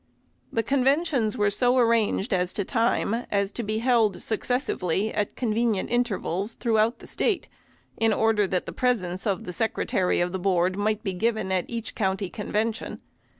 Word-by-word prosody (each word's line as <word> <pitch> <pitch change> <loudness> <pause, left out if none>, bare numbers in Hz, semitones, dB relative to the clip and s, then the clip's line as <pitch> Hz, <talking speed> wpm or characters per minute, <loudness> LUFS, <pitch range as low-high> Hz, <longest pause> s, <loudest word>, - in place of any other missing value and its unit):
The 225 - 0
conventions 270 -3 +1
were 205 -1 +2
so 245 +5 +3
arranged 230 -2 +2
as 180 -1 0
to 200 - -1
time, 230 -1 +1 0.2
as 200 -1 0
to 240 - -4
be 215 -1 -2
held 230 -4 +2
successively 220 - -1
at 205 -1 -2
convenient 225 -4 0
intervals 225 -3 -1
throughout 225 -1 +1
the - - -13
State, 405 -5 -1 0.5
in 225 0 +3
order 220 -1 +2
that 180 -1 -1
the - - -6
presence 195 -7 0
of 195 -3 -1
the 180 - -6
Secretary 190 -2 0
of 175 0 0
the 190 - -3
Board 180 -1 +1
might 210 +1 -1
be 195 -3 -2
given 215 0 -1
at 185 -2 +1
each 235 -1 -5
county 190 -2 -1
convention. 215 +1 -2
215 Hz, 165 wpm, -26 LUFS, 195-235 Hz, 0.5 s, so